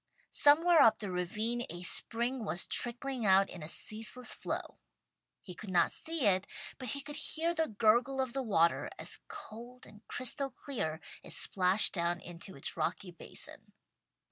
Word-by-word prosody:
Somewhere 325 +4 +5
up 220 -1 +6
the 205 -4 -5
ravine 215 +7 -2
a 175 +2 -7
spring 235 +6 +4
was 175 -3 0
trickling 245 +1 -1
out 195 -1 +4
in 175 - -9
a 150 - -7
ceaseless 225 +7 -2
flow. - - -5 0.6
He 180 - -9
could 200 +4 -10
not 175 -2 +2
see 325 -5 -3
it, 190 -1 +2 0.3
but 255 - -6
he 280 +4 -2
could 295 +1 -8
hear 325 +2 0
the 320 -1 0
gurgle 235 +5 +2
of 260 -2 -1
the 270 - -1
water, 170 -8 +2
as - - -3
cold 250 - -11
and 210 - -16
crystal 270 +3 -2
clear 190 - -5 0.2
it - - -9
splashed 190 +2 +3
down 170 -1 -1
into 175 +2 -9
its 140 - -6
rocky 180 +2 -3
basin. 170 - -6
225 Hz, 165 wpm, -32 LUFS, 185-265 Hz, 0.6 s, up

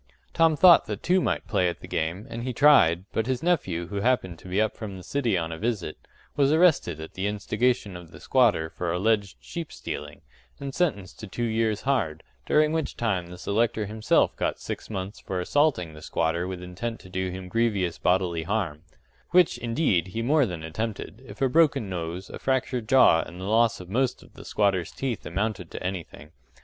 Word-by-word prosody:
Tom 165 -1 +4
thought 175 -5 +7
that 105 -2 -5
two 185 +1 +3
might - - -1
play 90 -1 +2
at 85 - -6
the - - -10
game, 85 +6 -2
and 115 0 -6
he 125 +1 -3
tried; 115 - +5
but 110 +1 0
his 130 +1 -1
nephew, 95 - 0
who 100 - -4
happened 100 -6 0
to 95 - -13
be 95 +2 0
up 110 0 +1
from 100 -4 -7
the 90 - -10
city 120 -7 0
on 80 -1 -2
a 80 - -6
visit, 105 -8 -2 0.4
was 140 -1 +3
arrested 155 - +3
at 80 - -8
the 95 +2 -2
instigation 105 0 0
of 90 -2 -10
the - - -13
squatter 110 -11 +2
for 85 -2 -3
alleged 100 +2 0
sheep 170 -3 -6
stealing, - - -7 0.4
and 140 -1 -5
sentenced 100 - -1
to 110 - -7
two 120 +5 -4
years' 110 -2 0
hard; 100 - 0 0.2
during 150 0 +4
which 160 -1 -2
time 95 -7 -1
the 90 +1 -10
selector 110 +3 0
himself 110 +1 +1
got - - -2
six - - -6
months 100 0 -5
for 95 - -4
assaulting 90 - +1
the 75 - -12
squatter 85 +3 -1
with 90 -1 -6
intent 105 +6 -5
to 95 - -14
do 95 0 -2
him 90 0 -7
grievous 100 -5 0
bodily 90 -2 +1
harm 85 -5 -2 0.5
which, 180 -2 +4
indeed, 115 - +1
he 115 +5 -4
more 145 +1 +3
than 85 -4 -6
attempted, 110 +6 -5
if - - -5
a - - +5
broken 140 -5 +3
nose, 85 +1 -4
a - - -7
fractured 125 -3 -1
jaw, 130 -11 +6
and 90 +1 -9
the 95 - -5
loss 115 +2 +3
of 90 - -10
most 125 +6 0
of - - -20
the - - -12
squatters' 95 -5 +1
teeth 130 -5 -4
amounted 95 -2 -2
to - - -7
anything. 90 -4 -6
105 Hz, 205 wpm, -26 LUFS, 90-125 Hz, 0.5 s, thought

